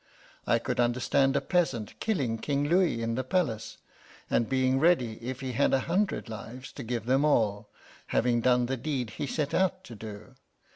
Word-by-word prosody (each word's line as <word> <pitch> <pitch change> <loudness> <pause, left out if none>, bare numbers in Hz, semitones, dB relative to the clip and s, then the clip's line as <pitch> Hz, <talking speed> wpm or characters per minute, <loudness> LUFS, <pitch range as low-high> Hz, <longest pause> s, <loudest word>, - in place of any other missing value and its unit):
I - - +4
could - - -3
understand 130 +3 +2
a - - +2
peasant, 160 - 0
killing 135 - -1
King 145 +3 0
Louis 170 -8 +2
in 115 0 -1
the 130 +3 -1
palace, 130 -7 -1 0.5
and 115 - +2
being 130 0 +2
ready, 130 -9 +2
if 130 +2 -5
he 130 -1 -3
had 120 - +2
a 135 - +1
hundred 195 +2 0
lives, 115 +4 -8
to - - -8
give 115 -1 -3
them 135 +3 +3
all, 110 -8 +1 0.4
having 120 -1 +2
done 125 0 +3
the 130 +2 -2
deed 130 -4 -3
he 145 - -4
set 145 0 -2
out 185 0 +1
to 120 - -10
do. 105 +2 -9
130 Hz, 185 wpm, -28 LUFS, 115-145 Hz, 0.5 s, I